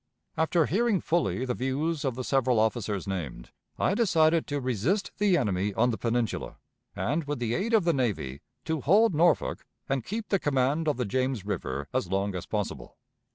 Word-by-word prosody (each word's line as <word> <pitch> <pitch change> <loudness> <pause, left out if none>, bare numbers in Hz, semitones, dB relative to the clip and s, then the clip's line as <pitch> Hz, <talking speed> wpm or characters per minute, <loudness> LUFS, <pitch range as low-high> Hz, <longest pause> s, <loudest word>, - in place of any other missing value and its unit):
After 160 0 +2
hearing 215 +3 +2
fully 160 -7 0
the 125 - -1
views 145 +5 -1
of 135 -4 -1
the 130 - -4
several 130 -3 +2
officers 110 -3 0
named, 80 -11 -5 0.3
I - - +2
decided 165 -7 +3
to 145 0 -2
resist 130 - 0
the 200 -4 +4
enemy 100 - 0
on 120 +2 +3
the 110 - -3
Peninsula, 115 -1 -1 0.4
and, 155 +2 -1
with 145 +1 -2
the 120 -1 -1
aid 225 - +1
of 215 - +4
the 170 0 +2
navy, 100 - -2 0.2
to 160 -2 -1
hold 205 - +4
Norfolk 160 -2 +2 0.2
and 135 -3 -1
keep 215 - -5
the 195 - +2
command 145 +2 +1
of 150 - +1
the 125 - -1
James 130 -1 -1
River 70 -8 -3
as - - 0
long 100 +1 0
as 90 - -5
possible. 105 -3 -4
135 Hz, 185 wpm, -28 LUFS, 110-165 Hz, 0.4 s, the